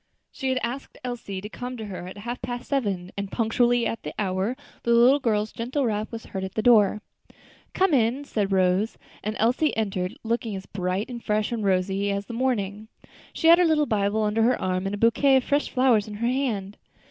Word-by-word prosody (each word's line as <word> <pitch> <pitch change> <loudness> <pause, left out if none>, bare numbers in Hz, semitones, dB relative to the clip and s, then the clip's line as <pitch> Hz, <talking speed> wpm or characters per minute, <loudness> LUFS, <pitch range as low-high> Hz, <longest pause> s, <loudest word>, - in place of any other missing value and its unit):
She 265 -2 -3
had 260 - +1
asked 245 +4 -5
Elsie 235 -6 -5
to 210 - -6
come 250 +3 -6
to 220 - -6
her 185 -3 -7
at 190 - -9
half 240 +4 -5
past 245 0 -5
seven, 200 -10 -1
and 200 -1 -4
punctually 240 +1 +2
at 225 - -2
the 150 - -7
hour 195 +4 -1 0.3
the 235 0 +2
little 250 +5 +6
girl's 215 -4 0
gentle 255 +4 -2
rap 215 -1 -2
was 230 -1 -7
heard 190 -1 -5
at 190 0 -6
her 220 - +1
door. 215 -3 +5 0.7
"Come 380 -3 +3
in," 255 +2 +2
said 205 -7 -1
Rose, 190 +3 +2 0.3
and 215 +1 -2
Elsie 250 +7 +1
entered, 190 -4 -2
looking 225 -2 -2
as 190 0 -7
bright 185 +1 -2
and 240 -2 -7
fresh 210 0 0
and 230 -3 -2
rosy 195 +1 +1
as 200 0 -2
the 235 - -8
morning. 220 -4 -1 0.4
She 325 - 0
had 335 +1 +8
her 360 - +5
little 310 -2 +3
Bible 215 -2 0
under 210 +1 +1
her 245 +3 +3
arm, 185 +1 -1
and 200 - -2
a - - -6
bouquet 230 +5 +4
of 260 - +3
fresh 285 +3 0
flowers 250 -5 +3
in 210 - -7
her 235 +3 -1
hand. 230 -7 -2
220 Hz, 215 wpm, -25 LUFS, 200-245 Hz, 0.7 s, had